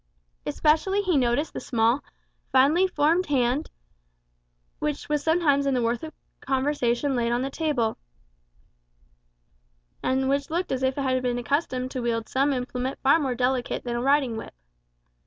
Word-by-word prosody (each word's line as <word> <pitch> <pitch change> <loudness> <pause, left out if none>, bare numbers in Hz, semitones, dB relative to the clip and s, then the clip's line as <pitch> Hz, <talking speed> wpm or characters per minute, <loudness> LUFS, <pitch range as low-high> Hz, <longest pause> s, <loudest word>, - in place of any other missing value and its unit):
Especially 380 +7 +2
he 365 -4 +1
noticed 265 +3 +1
the - - -4
small, 235 +3 +1 0.5
finely 295 +8 +4
formed 335 +2 +1
hand, 265 +1 +1 1.1
which 150 -2 -3
was 295 -1 0
sometimes 305 -4 +2
in 275 - +2
the 250 - +1
warmth 230 +1 0
of 315 - -7 0.3
conversation 265 -1 0
laid 235 -1 0
on 240 +2 0
the 270 - -3
table, 270 -8 -1 2.0
and 265 +1 0
which 280 +1 0
looked 345 +3 -2
as 265 -1 -1
if 260 +1 0
it 280 - -1
had 255 -1 +1
been 245 -1 -1
accustomed 255 -1 -1
to 255 - -3
wield 230 -2 -1
some 275 +2 +1
implement 255 0 -3
far 280 +4 +5
more 265 -5 -1
delicate 250 0 -1
than 240 -1 -3
a 240 - -1
riding 270 -3 +2
whip. - - -8
265 Hz, 155 wpm, -25 LUFS, 245-295 Hz, 2.0 s, far